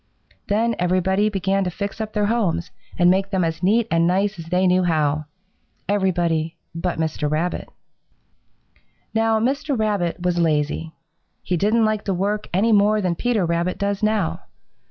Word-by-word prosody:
Then 225 +3 +1
everybody 185 +3 +2
began 195 -1 0
to 180 - -1
fix 200 +4 -5
up 215 0 -5
their 210 -1 +1
homes 205 -7 0 0.3
and 175 -1 +5
make 195 +1 +1
them 190 -3 0
as 165 0 -2
neat 215 +5 +2
and 165 0 +3
nice 195 +2 0
as 165 - -7
they 180 +2 +1
knew 180 0 +4
how 155 -3 +1 0.6
everybody 170 -5 0 0.2
but 170 +2 -2
Mr. 160 -2 -1
Rabbit. 160 +4 -2 1.4
"Now 225 0 +2
Mr. 275 +4 0
Rabbit 205 -6 0
was 175 -1 0
lazy. 160 0 0 0.5
He 180 - -1
didn't 215 +6 +2
like 215 -1 0
to 195 - 0
work 205 +3 -2
any 205 +6 +2
more 210 0 +4
than 180 -4 0
Peter 220 +1 0
Rabbit 170 +2 -1
does 200 0 -1
now. 215 -5 0
190 Hz, 160 wpm, -22 LUFS, 170-210 Hz, 1.4 s, and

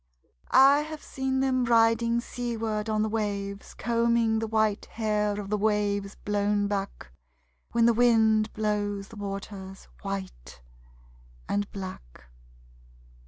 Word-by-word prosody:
I 275 +2 +7
have 310 0 -6
seen 265 0 -2
them 260 -1 +1
riding 230 0 +3
seaward 225 -3 -3
on 215 0 +1
the - - 0
waves 200 -2 -3
Combing 230 0 +1
the 225 - -2
white 215 -1 +1
hair 210 -2 -1
of 200 0 -6
the 210 - +1
waves 205 -1 0
blown 205 0 +1
back 195 - -4 0.6
When 235 -1 +4
the 235 - +5
wind 220 -2 +4
blows 205 -2 -2
the 225 - -12
water 195 -1 -6 0.3
white 190 - -6 0.9
and 205 0 -1
black. 185 - -8
215 Hz, 120 wpm, -27 LUFS, 200-230 Hz, 0.9 s, I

